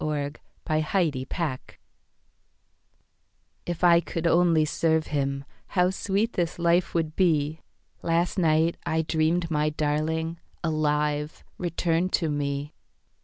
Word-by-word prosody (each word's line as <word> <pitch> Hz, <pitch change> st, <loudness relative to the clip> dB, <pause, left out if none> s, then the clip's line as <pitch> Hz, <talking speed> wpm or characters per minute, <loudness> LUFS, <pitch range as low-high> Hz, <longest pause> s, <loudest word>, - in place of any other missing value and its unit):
Service 145 Hz, -1 st, -3 dB, 0.2 s
Anna 155 Hz, 0 st, +1 dB
Hempstead 150 Hz, -6 st, 0 dB
Branch 155 Hz, -8 st, -3 dB, 1.9 s
IF 175 Hz, 0 st, -4 dB
I 170 Hz, -1 st, +7 dB
could 165 Hz, -1 st, -4 dB
only 170 Hz, -2 st, +4 dB
serve 160 Hz, +1 st, +1 dB
him, 140 Hz, -1 st, -2 dB, 0.2 s
How 180 Hz, -1 st, +2 dB
sweet 200 Hz, +4 st, -1 dB
this 175 Hz, -2 st, -1 dB
life 170 Hz, +1 st, +2 dB
would 160 Hz, -2 st, 0 dB
be. 155 Hz, -4 st, +2 dB, 0.4 s
Last 170 Hz, +3 st, +1 dB
night 160 Hz, 0 st, +3 dB
I 160 Hz, 0 st, 0 dB
dreamed 165 Hz, +2 st, 0 dB
my 150 Hz, 0 st, +2 dB
darling, 155 Hz, +2 st, -1 dB, 0.2 s
Alive, 150 Hz, -1 st, 0 dB, 0.2 s
returned 170 Hz, +1 st, 0 dB
to 165 Hz, -3 st, +1 dB
me. 145 Hz, 0 st, -2 dB
160 Hz, 120 wpm, -26 LUFS, 150-170 Hz, 1.9 s, I